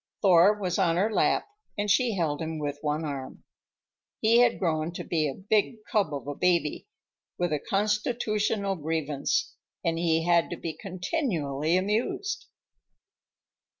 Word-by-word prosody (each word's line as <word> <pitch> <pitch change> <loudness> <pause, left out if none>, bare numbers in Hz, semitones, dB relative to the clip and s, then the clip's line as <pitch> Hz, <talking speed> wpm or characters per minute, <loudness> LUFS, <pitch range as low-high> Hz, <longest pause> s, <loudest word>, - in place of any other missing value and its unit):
Thor 190 +2 +6
was 185 -1 -1
on 170 -3 +3
her 205 +5 +1
lap - - +2 0.3
and 205 0 -1
she 225 +1 +3
held 155 -5 -1
him 160 0 -3
with 145 -1 -3
one 150 +1 -1
arm. 140 -3 -6 0.8
He 230 +2 +4
had 245 -1 +4
grown 160 -2 -1
to - - -5
be 155 -3 0
a 135 - -6
big 215 +3 0
cub 200 -8 +2
of 140 -2 -5
a 145 - -2
baby, 170 -1 0 0.5
with 175 -3 0
a 150 - 0
constitutional 210 - 0
grievance, 155 -2 -1 0.3
and 165 -1 +1
he 165 -1 +2
had 170 -1 +3
to - - -5
be 165 - -4
continually 175 - -1
amused. 230 - -1
175 Hz, 150 wpm, -27 LUFS, 155-210 Hz, 0.8 s, Thor